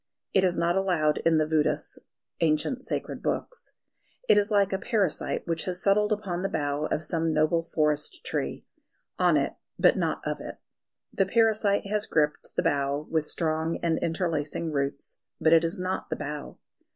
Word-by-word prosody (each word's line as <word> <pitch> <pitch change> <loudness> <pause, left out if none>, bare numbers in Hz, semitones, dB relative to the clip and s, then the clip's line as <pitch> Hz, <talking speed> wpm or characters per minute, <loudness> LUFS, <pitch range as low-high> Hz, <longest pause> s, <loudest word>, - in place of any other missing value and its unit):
It 190 - +4
is 180 -2 +2
not 170 +1 +1
allowed 175 -6 +1
in 165 -1 +4
the 155 - +3
Védas 155 -1 0 0.4
(ancient 160 - +1
sacred - - -3
books). - - -4 0.5
It - - +6
is 205 0 +3
like 200 -2 +2
a 190 - 0
parasite 200 -7 -1
which 165 -1 -1
has 180 -1 -3
settled 210 +2 +2
upon 195 -4 -2
the 195 - -1
bough 145 +1 -1
of 155 - -2
some 165 -1 0
noble 155 +2 +2
forest 150 -2 -1
tree - - -2 0.5
on - - +4
it, - - 0 0.2
but - - +4
not - - -1
of - - -2
it. - - -7 0.6
The 195 - +1
parasite 215 -2 +3
has 210 +1 -1
gripped 150 -1 0
the - - +1
bough 140 +1 0
with 160 -2 +1
strong 160 0 -1
and 165 -1 +1
interlacing 165 -2 -2
roots; 140 -1 -3 0.2
but 160 +1 +4
it 165 0 +6
is 165 0 -1
not 185 +1 -3
the - - -1
bough. 145 0 -6
165 Hz, 175 wpm, -27 LUFS, 155-195 Hz, 0.6 s, It